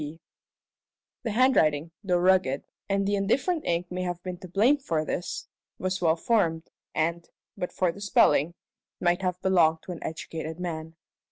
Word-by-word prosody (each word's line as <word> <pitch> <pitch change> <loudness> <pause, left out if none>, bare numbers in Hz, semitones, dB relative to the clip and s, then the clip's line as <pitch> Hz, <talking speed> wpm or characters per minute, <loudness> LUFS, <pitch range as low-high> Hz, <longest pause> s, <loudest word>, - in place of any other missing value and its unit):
P. 150 +2 -6 1.0
The 235 - -3
handwriting, 170 - +3
though 180 -3 +2
rugged 180 -6 +3 0.3
and 195 0 +1
the 205 - +1
indifferent 275 - +1
ink 175 +1 -1
may 180 0 -2
have 175 -1 -2
been 180 -1 -5
to 185 - -9
blame 220 +11 +4
for 160 - -1
this 175 +2 -4 0.3
was 185 0 -2
well 165 -2 +4
formed, 165 -4 0 0.2
and, 170 +2 -1 0.3
but 180 - -4
for 180 -2 +1
the 200 - -12
spelling, 170 -5 +3 0.4
might 175 +1 +2
have 180 -1 -1
belonged 165 -4 +3
to - - -7
an 170 - -7
educated 160 0 -5
man. 160 -2 -5
175 Hz, 165 wpm, -27 LUFS, 160-190 Hz, 1.0 s, blame